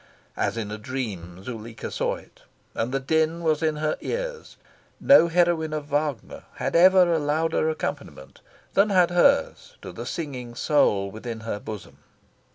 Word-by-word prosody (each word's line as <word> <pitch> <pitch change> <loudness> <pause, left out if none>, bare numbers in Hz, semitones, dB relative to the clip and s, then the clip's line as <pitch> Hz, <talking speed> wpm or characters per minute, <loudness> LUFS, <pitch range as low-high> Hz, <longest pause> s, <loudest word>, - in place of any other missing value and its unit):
As - - -1
in 105 -2 -4
a 105 - -5
dream, 100 -8 -6
Zuleika 115 0 -7
saw - - -1
it. - - -16 0.3
And 115 +2 -2
the 135 - 0
din 160 +4 0
was 155 -1 +1
in 155 -1 +1
her 155 0 -1
ears. - - -5 0.4
No 275 -11 +6
heroine 170 -2 +1
of 150 -1 -3
Wagner 145 -3 -2
had - - -3
ever 180 0 +6
a 165 - +2
louder 155 +2 0
accompaniment 70 - -6 0.3
than 200 +2 +4
had 180 -3 +4
ours 280 - +2
to - - -7
the - - -7
surging 130 -8 -5
soul 100 -9 +2
within 110 +1 -7
her 110 -2 -4
bosom. 105 -2 -9
150 Hz, 160 wpm, -25 LUFS, 115-170 Hz, 0.4 s, No